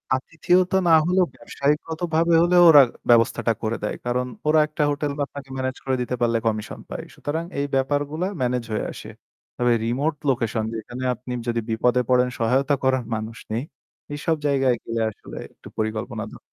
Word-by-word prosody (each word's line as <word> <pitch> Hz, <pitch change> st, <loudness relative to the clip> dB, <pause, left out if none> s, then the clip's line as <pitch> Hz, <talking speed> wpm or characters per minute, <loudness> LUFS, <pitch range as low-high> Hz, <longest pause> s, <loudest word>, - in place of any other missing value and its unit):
আতিথিয়তা 180 Hz, +7 st, +1 dB
না -, -, +5 dB
হলেও 180 Hz, +1 st, +3 dB
ব্যবসায়িকগতভাবে 160 Hz, +4 st, 0 dB
হলেও 175 Hz, 0 st, +5 dB
ওরা 145 Hz, -3 st, +10 dB, 0.3 s
ব্যবস্থাটা 115 Hz, 0 st, +4 dB
করে 110 Hz, +1 st, -1 dB
দেয়। 105 Hz, -, -2 dB
কারণ 125 Hz, +1 st, 0 dB, 0.2 s
ওরা 155 Hz, 0 st, +5 dB
একটা 150 Hz, 0 st, -1 dB
হোটেল 145 Hz, 0 st, -2 dB
আপনাকে 140 Hz, -1 st, -5 dB
মেনেজ 130 Hz, 0 st, -2 dB
করে 130 Hz, -1 st, +1 dB
দিতে 125 Hz, +1 st, -2 dB
পারলে 115 Hz, -1 st, +2 dB
কমিশন 110 Hz, -1 st, -3 dB
পায়। -, -, -5 dB
সুতরাং 160 Hz, +3 st, -3 dB, 0.2 s
এই 140 Hz, -, 0 dB
ব্যাপারগুলা 145 Hz, +6 st, 0 dB
মেনেজ 125 Hz, -1 st, 0 dB
হয়ে -, -, -1 dB
আসে। -, -, -9 dB, 0.5 s
তবে 120 Hz, -1 st, +3 dB
রিমোট 140 Hz, +7 st, 0 dB
লোকেশন 115 Hz, -3 st, 0 dB
যেখানে 120 Hz, +3 st, -6 dB
আপনি 125 Hz, +1 st, -7 dB
যদি 115 Hz, 0 st, 0 dB
বিপদে 125 Hz, +3 st, +2 dB
পড়েন 125 Hz, 0 st, +4 dB
সহায়তা 130 Hz, +5 st, +2 dB
করার 130 Hz, -2 st, +2 dB
মানুষ 110 Hz, +1 st, -5 dB
নেই। 115 Hz, +4 st, -1 dB, 0.5 s
এসব 160 Hz, +2 st, 0 dB
জায়গায় 135 Hz, -3 st, +2 dB
গেলে 115 Hz, 0 st, -2 dB
আসলে -, -, -12 dB, 0.2 s
একটু -, -, -15 dB
পরিকল্পনা 110 Hz, +1 st, -3 dB
দর -, -, -12 dB
130 Hz, 165 wpm, -23 LUFS, 115-150 Hz, 0.5 s, ওরা